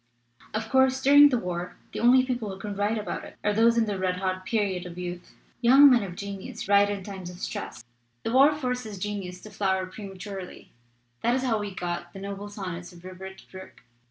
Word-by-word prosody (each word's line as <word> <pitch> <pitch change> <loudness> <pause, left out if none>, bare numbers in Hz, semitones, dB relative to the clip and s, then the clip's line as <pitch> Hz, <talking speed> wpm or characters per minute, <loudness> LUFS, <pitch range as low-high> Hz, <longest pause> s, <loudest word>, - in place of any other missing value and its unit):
"Of 220 +1 -2
course, 265 +2 +3
during 285 +2 +8
the 255 - +1
war 180 -4 -4 0.2
the - - -5
only 255 +2 +5
people 245 -5 -2
who 190 - -6
can 205 0 -5
write 205 +3 0
about 210 - -4
it - - -11
are 210 - +2
those 230 +2 +4
who 230 - +3
are - - +4
in - - -3
the 200 -2 -2
red 185 -1 0
hot 185 0 -3
period 195 -5 -1
of 175 0 -10
youth. 175 0 -7 0.3
Young 270 +4 +8
men 245 -2 +5
of 185 -3 -6
genius 200 +4 -6
write 200 0 +5
in 200 -2 -3
times 190 -2 -7
of 180 - -10
stress. 115 -8 -6 0.4
The 225 - -2
war 275 +3 +7
forces 250 -7 -3
genius 185 -2 -5
to 215 - -11
flower 190 -2 0
prematurely 195 -1 -9 0.5
that 240 +1 +2
is 260 - -1
how 230 -4 +1
we 205 -1 -3
got 175 -1 -4
the 195 - -8
noble 200 +1 -6
sonnets 180 -4 -6
of 175 -1 -15
Rupert 190 +1 -9
Brooke. 190 -7 -12
200 Hz, 215 wpm, -27 LUFS, 185-230 Hz, 0.5 s, during